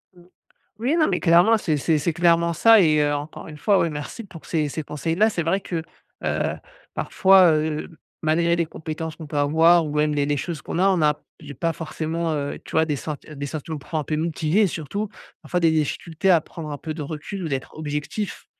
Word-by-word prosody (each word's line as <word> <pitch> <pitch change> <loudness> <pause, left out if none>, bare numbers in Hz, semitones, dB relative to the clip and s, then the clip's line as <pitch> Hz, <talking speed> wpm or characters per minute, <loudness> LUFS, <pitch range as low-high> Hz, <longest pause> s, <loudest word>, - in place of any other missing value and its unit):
Mmh. 175 - -18 0.6
Oui, 260 +9 +1
non, 310 - +4
mais - - 0
clairement, 180 +6 +5
c'est 155 -6 0
c'est 155 +2 +1
c'est 160 +3 0
clairement 170 0 +3
ça 225 +7 +6
et 155 -4 +4
heu, 145 0 +2
encore 145 +2 -6
une 150 -1 -10
fois, 200 +5 +3
ouais, 170 - +1
merci 150 +9 -6
pour 170 -5 -13
ces 155 -3 0
ces 155 +2 -4
conseils-là, 165 +9 0
c'est 175 -5 -2
vrai 180 +5 +1
que, 165 -4 -4 0.4
heu, - - 0 0.4
parfois, 190 -3 +5
heu, 155 0 -1 0.3
malgré 170 +2 +2
les 170 -1 0
compétences 160 0 -6
qu'on 160 - -9
peut 145 - -6
avoir 160 +4 +5
ou 150 - -5
même 150 0 +2
les 145 -1 +1
les 145 0 0
choses 155 +1 -4
qu'on - - -4
a, 190 +2 +4
on 185 -4 +2
a 150 -1 +2 0.2
j'ai 145 -2 -9
pas 165 +5 -1
forcément, 165 +1 -3
heu, 145 -1 -3
tu - - -12
vois, 160 0 +3
des 150 -3 -2
sen 150 +2 -5
des 145 -1 -5
sentiments 155 +1 -5
pour 155 +3 -4
un 150 - -2
peu, 155 - -2
motiver 165 +4 +1
et - - +5
surtout, 190 +5 -4 0.3
parfois, 180 - -1
des 165 -1 +4
difficultés 160 +3 0
à 170 -3 +6
prendre 155 0 -8
un 145 - -5
peu 155 +1 -5
de 155 - -5
recul 155 +6 -6
ou - - -2
d'être 135 -2 -4
objectif. 150 +7 -4
160 Hz, 225 wpm, -23 LUFS, 150-170 Hz, 0.6 s, ça